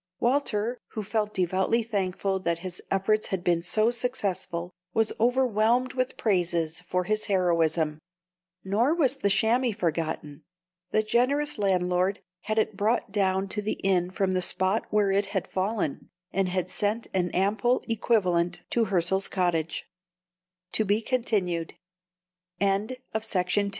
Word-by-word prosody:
Walter, 240 -2 0
who 215 - -3
felt 210 +1 -1
devoutly 190 +5 +1
thankful 195 -3 -1
that 170 -2 0
his 180 -1 -5
efforts 205 +3 +1
had 190 -2 -3
been 170 -2 +2
so 215 +6 +2
successful, 195 -8 -2 0.2
was 225 -1 +2
overwhelmed 245 0 +2
with 255 -1 -2
praises 175 -5 0
for 180 0 0
his 215 +3 0
heroism. 165 -5 +1 0.6
Nor 230 +11 +2
was 280 -5 +2
the 205 -7 +1
chamois 225 +4 +3
forgotten. 160 -4 -2 0.5
The 215 - +2
generous 260 +5 +1
landlord 185 0 +1 0.3
had 215 +1 -1
it 220 -1 +1
brought 210 +1 0
down 195 -1 +1
to 210 - 0
the 210 - -2
inn 180 -2 +2
from 190 0 0
the 185 0 +1
spot 185 +4 +1
where 210 -2 +2
it 200 +1 +1
had 195 -2 -2
fallen, 190 -5 -2 0.2
and 195 -1 0 0.2
sent 210 +4 0
an 180 -2 +1
ample 205 +7 +1
equivalent 185 -7 +1
200 Hz, 115 wpm, -27 LUFS, 180-225 Hz, 0.6 s, chamois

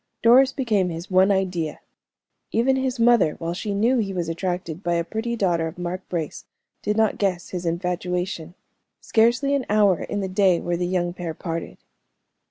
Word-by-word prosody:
Doris 255 +3 +6
became 220 -9 0
his 170 +3 -7
one 185 +1 +5
idea. 180 -5 -1 0.7
Even 260 +4 +2
his 260 -1 -1
mother, 230 -9 +4
while 165 +1 -4
she 200 +3 -3
knew 235 +5 +2
he 195 -3 -2
was 170 -2 -2
attracted 175 -1 -3
by 175 -3 0
a 170 - +1
pretty 225 +6 -3
daughter 175 -6 +1
of 160 - -8
Mark 180 +1 -4
Brace, 165 -4 -4 0.4
did 210 +1 -1
not 220 -2 +2
guess 185 -4 -1
his 180 -2 -4
infatuation. 180 0 -2 0.4
Scarcely 240 +5 +2
an 275 -3 0
hour 205 -4 +3
in 205 - -3
the 195 - -2
day 185 -2 +3
were 175 0 -2
the 175 +1 -1
young 175 -1 -1
pair 175 -3 -5
parted. 165 -1 -5
185 Hz, 175 wpm, -23 LUFS, 175-220 Hz, 0.7 s, Doris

